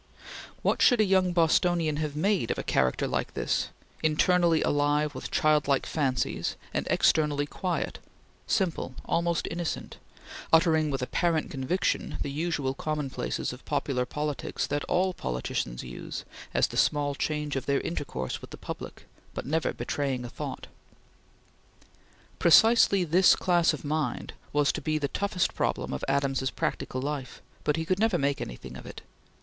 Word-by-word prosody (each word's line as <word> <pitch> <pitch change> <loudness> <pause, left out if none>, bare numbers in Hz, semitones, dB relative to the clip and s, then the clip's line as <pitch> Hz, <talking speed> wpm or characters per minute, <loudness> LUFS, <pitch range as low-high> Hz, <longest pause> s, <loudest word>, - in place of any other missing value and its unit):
What - - +1
should 245 -3 +6
a - - +6
young 190 -2 +3
Bostonian 170 -2 +2
have 150 -1 -2
made 180 - +1
of - - -1
a - - -3
character 65 -1 +1
like - - -2
this, - - 0 0.3
internally 165 +1 +3
alive 145 +1 +1
with 130 - -6
childlike 150 -3 +2
fancies, 135 -5 -1 0.2
and - - -1
externally 150 -2 +3
quiet, 175 +3 -3 0.5
simple, 170 -8 0
almost 170 0 0
innocent; 170 0 -4 0.5
uttering 160 -2 +4
with 135 -2 -2
apparent 165 +4 0
conviction 140 +7 -1
the 140 - -4
usual 145 -3 -1
commonplaces 150 -3 -3
of 125 - -12
popular 135 -3 -1
politics 150 +1 -2
that 145 0 -2
all 185 +1 +1
politicians 60 - -3
use 60 -1 -7 0.3
as - - +3
the - - -6
small 145 -1 +2
change 150 0 -2
of 135 - -3
their 140 -1 +2
intercourse 65 - -4
with - - -10
the - - -9
public; - - -8 0.3
but - - -4
never 155 +3 0
betraying 135 -4 -2
a - - -6
thought? - - -6 1.7
Precisely 200 +1 +6
this 175 +3 +5
class 175 -2 +3
of 155 -1 -6
mind 155 +1 -2 0.2
was 145 -1 +3
to - - -5
be 155 -1 0
the 145 -2 -1
toughest 195 0 0
problem - - -1
of 65 - -4
Adams's 135 -1 +1
practical 130 -1 -3
life, 140 -3 -4 0.2
but 150 - +2
he 160 - -2
could 185 +3 0
never 220 -4 +3
make 140 -1 0
anything 65 +1 -7
of 60 - -10
it. - - -9
150 Hz, 155 wpm, -28 LUFS, 140-170 Hz, 1.7 s, should